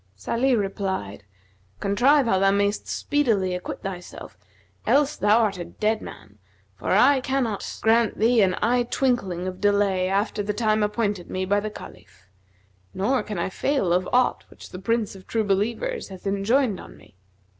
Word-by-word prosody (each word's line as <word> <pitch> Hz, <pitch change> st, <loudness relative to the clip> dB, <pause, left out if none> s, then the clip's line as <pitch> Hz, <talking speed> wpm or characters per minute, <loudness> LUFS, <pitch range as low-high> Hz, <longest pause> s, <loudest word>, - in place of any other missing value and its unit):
Salih 235 Hz, -, 0 dB
replied, 190 Hz, -, -3 dB, 0.5 s
"Contrive 260 Hz, +8 st, +3 dB
how 190 Hz, -5 st, +2 dB
thou 195 Hz, 0 st, +4 dB
mayst 200 Hz, +1 st, 0 dB
speedily 220 Hz, -11 st, 0 dB
acquit 180 Hz, 0 st, -6 dB
thyself, 180 Hz, -2 st, -8 dB, 0.5 s
else 290 Hz, +1 st, +3 dB
thou 210 Hz, +2 st, +3 dB
art 200 Hz, -4 st, 0 dB
a -, -, -3 dB
dead 215 Hz, +5 st, -1 dB
man; 105 Hz, -1 st, -12 dB, 0.4 s
for 95 Hz, -, -9 dB
I 270 Hz, +1 st, +5 dB
cannot 255 Hz, -6 st, -2 dB
grant 225 Hz, -1 st, +3 dB
thee 230 Hz, +1 st, +4 dB
an 185 Hz, -2 st, +3 dB
eye 245 Hz, +3 st, +3 dB
twinkling 195 Hz, -10 st, 0 dB
of 185 Hz, 0 st, -6 dB
delay 200 Hz, -2 st, +2 dB
after 205 Hz, +2 st, 0 dB
the 205 Hz, 0 st, -3 dB
time 215 Hz, -1 st, +1 dB
appointed 210 Hz, -3 st, -1 dB
me 185 Hz, 0 st, -2 dB
by 205 Hz, +2 st, +2 dB
the 215 Hz, +1 st, -4 dB
Caliph; 95 Hz, -, -13 dB, 0.7 s
nor 245 Hz, +8 st, +1 dB
can 210 Hz, -2 st, -6 dB
I 170 Hz, -, -1 dB
fail 235 Hz, -7 st, 0 dB
of 180 Hz, +1 st, 0 dB
aught 250 Hz, 0 st, +2 dB
which -, -, -13 dB
the 180 Hz, -, -7 dB
Prince 225 Hz, +2 st, -1 dB
of 190 Hz, -, -14 dB
True 225 Hz, -1 st, 0 dB
Believers 230 Hz, -, -1 dB
hath 190 Hz, -1 st, -12 dB
enjoined 200 Hz, +3 st, +1 dB
on -, -, -12 dB
me. 100 Hz, -, -20 dB
205 Hz, 165 wpm, -24 LUFS, 190-235 Hz, 0.7 s, I